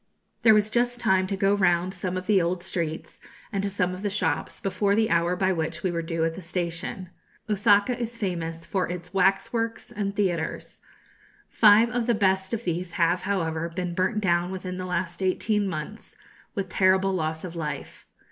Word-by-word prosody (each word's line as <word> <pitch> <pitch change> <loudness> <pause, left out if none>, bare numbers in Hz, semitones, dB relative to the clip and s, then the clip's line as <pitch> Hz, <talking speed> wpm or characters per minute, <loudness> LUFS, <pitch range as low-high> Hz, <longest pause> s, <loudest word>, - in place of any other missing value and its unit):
] - - -48
There 225 -2 +7
was 210 0 +2
just 245 +1 +1
time 190 -4 +2
to 195 0 -2
go 195 +1 +3
round 185 -2 +2
some 185 0 -3
of 185 - -5
the 200 -2 +4
old 175 +1 -1
streets, 165 -4 -4 0.3
and 200 -3 -1
to 200 - -1
some 185 -2 -1
of 185 - -7
the 205 - -1
shops, 185 -6 -2
before 200 +1 +1
the 220 0 +2
hour 170 +1 +2
by 190 +1 +1
which 160 0 -3
we 185 - +1
were 170 -1 -2
due 165 0 -1
at 165 - -1
the 185 - -8
station. 175 +1 -4 0.4
Osaka 210 +2 +3
is 235 -1 -5
famous 170 -5 -3
for 190 -3 -1
its 180 +1 -6
waxworks 200 +4 0
and 200 -1 -3
theatres. 175 -6 -2 0.7
Five 220 +2 +6
of 240 0 -1
the 240 - +3
best 190 -2 +1
of 230 0 -2
these 175 -1 -3
have, 175 +1 +2
however, 170 -4 -1
been 180 +1 -4
burnt 185 +4 0
down 175 -2 +2
within 185 -1 -5
the 185 0 -4
last 175 0 -3
eighteen 205 +2 +1
months, 185 +5 -6 0.4
with 195 -2 -2
terrible 190 +1 +3
loss 160 -3 -2
of 175 -2 -7
life. 155 -3 -6
185 Hz, 195 wpm, -26 LUFS, 170-205 Hz, 0.7 s, There